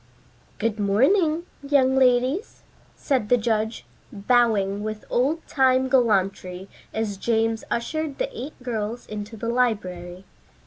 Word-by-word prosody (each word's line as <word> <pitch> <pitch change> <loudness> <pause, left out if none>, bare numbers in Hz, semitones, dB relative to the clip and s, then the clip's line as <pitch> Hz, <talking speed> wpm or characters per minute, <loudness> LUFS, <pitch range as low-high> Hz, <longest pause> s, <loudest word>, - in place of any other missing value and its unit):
"Good 220 -1 -1
morning, 305 - +3 0.2
young 275 -2 +3
ladies," 260 - +2 0.3
said 255 -7 -1
the 245 - +5
judge, 220 -1 -1 0.3
bowing 205 -2 +2
with 215 0 -5
old 290 +7 +1
time 260 -1 +3
gallantry 195 -6 +1 0.2
as 215 -3 -2
James 225 +1 0
ushered 310 +5 -2
the - - -3
eight 300 - -6
girls 230 -1 -3
into 210 +1 -7
the 230 +2 -3
library. 185 -7 -1
235 Hz, 120 wpm, -24 LUFS, 210-265 Hz, 0.3 s, the